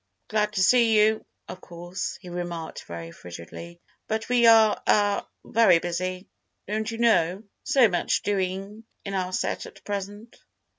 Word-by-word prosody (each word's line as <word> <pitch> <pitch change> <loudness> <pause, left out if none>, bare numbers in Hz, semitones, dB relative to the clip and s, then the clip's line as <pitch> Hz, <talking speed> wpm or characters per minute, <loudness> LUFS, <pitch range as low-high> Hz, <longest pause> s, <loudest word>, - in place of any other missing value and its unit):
"Glad 210 -1 0
to 190 - +1
see 230 +1 +5
you, 215 +1 +3 0.2
of 185 - -9
course," 175 +2 -6
he 180 - -11
remarked, 175 -2 -6
very 85 -1 -8
frigidly, 90 - -10 0.3
"but 220 +1 -3
we 240 -1 +4
are, 220 -2 +6
er—very 205 -1 +3
busy, 180 +2 -3 0.4
don't 215 +2 -2
you 230 - -5
know—so 225 +3 +2
much 180 -4 0
doing 195 +2 -2 0.2
in 200 - -4
our 185 -1 -2
set - - -2
at - - -16
present." 205 +3 -6
200 Hz, 140 wpm, -25 LUFS, 175-220 Hz, 0.4 s, are